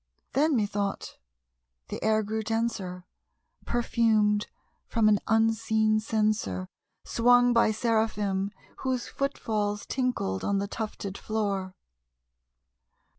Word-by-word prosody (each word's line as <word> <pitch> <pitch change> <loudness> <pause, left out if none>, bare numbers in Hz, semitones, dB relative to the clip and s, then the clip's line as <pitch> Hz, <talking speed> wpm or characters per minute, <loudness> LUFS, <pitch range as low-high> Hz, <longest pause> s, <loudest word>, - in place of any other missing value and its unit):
Then, 295 +3 +3
methought, 205 -2 -2 0.7
the - - -5
air 220 0 +3
grew 220 +2 -2
denser, 220 -5 -2 0.6
perfumed 220 -3 +2 0.4
from 225 -2 +2
an 210 -1 +4
unseen 220 -1 +2
censer 215 - 0 0.4
Swung 245 +1 +4
by 230 -2 +4
Seraphim 210 -3 0 0.3
whose 260 -2 -2
foot 275 +1 -2
falls 210 -2 -2
tinkled 245 - -1
on 200 - +1
the 200 +1 -1
tufted 205 -2 -5
floor. 200 -4 -2
215 Hz, 100 wpm, -28 LUFS, 205-230 Hz, 0.7 s, an